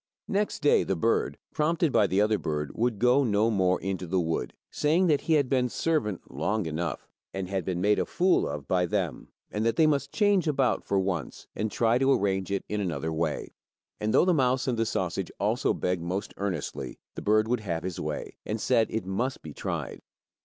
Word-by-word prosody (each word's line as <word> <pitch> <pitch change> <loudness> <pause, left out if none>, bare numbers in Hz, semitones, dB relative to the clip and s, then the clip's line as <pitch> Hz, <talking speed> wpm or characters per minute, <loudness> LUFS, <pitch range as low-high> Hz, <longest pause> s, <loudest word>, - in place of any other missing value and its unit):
Next 200 -5 -1
day 145 - +5
the 95 - -1
bird, 115 +7 +1 0.2
prompted 160 +1 +1
by 100 - +4
the 95 +2 +2
other 105 0 +2
bird, 75 -2 -2
would 120 -1 0
go 125 +5 +4
no 110 -1 +2
more 95 -3 +2
into 95 -2 -3
the 95 +2 +1
wood, 80 -1 -1 0.2
saying 160 +5 +2
that 150 -5 +3
he 165 - +1
had 145 -4 +3
been 125 -2 +1
servant 115 - -1
long 100 +9 -1
enough, 80 -2 -3 0.3
and 95 -1 -3
had 95 -1 -2
been 90 -2 -2
made 105 +3 +3
a - - -1
fool 185 +1 +2
of 70 -2 -6
by 90 -1 +2
them, - - -2 0.2
and 105 - -1
that 115 0 +1
they 160 - +5
must 140 -2 +1
change 205 -5 +2
about 135 -4 +1
for 100 - 0
once, 95 -5 -3
and 110 0 -2
try 115 +1 +2
to 135 +1 +3
arrange 95 -4 0
it 100 - -1
in 105 0 -2
another 80 -4 -2
way. 80 -1 -2 0.5
And, 105 +1 0
though - - +5
the 185 - +4
mouse 130 -3 +2
and 125 - +1
the 115 0 0
sausage 90 -1 -2
also - - +1
begged 90 -1 -1
most 90 +4 -3
earnestly, 95 -7 -4 0.2
the - - -6
bird 110 +1 +3
would 120 0 +1
have 85 -6 -3
his 90 -1 -4
way, - - -4
and 110 +1 -3
said 115 0 +3
it 110 -4 -3
must 120 +8 -2
be 75 - -8
tried. - - -4
105 Hz, 210 wpm, -28 LUFS, 90-130 Hz, 0.5 s, day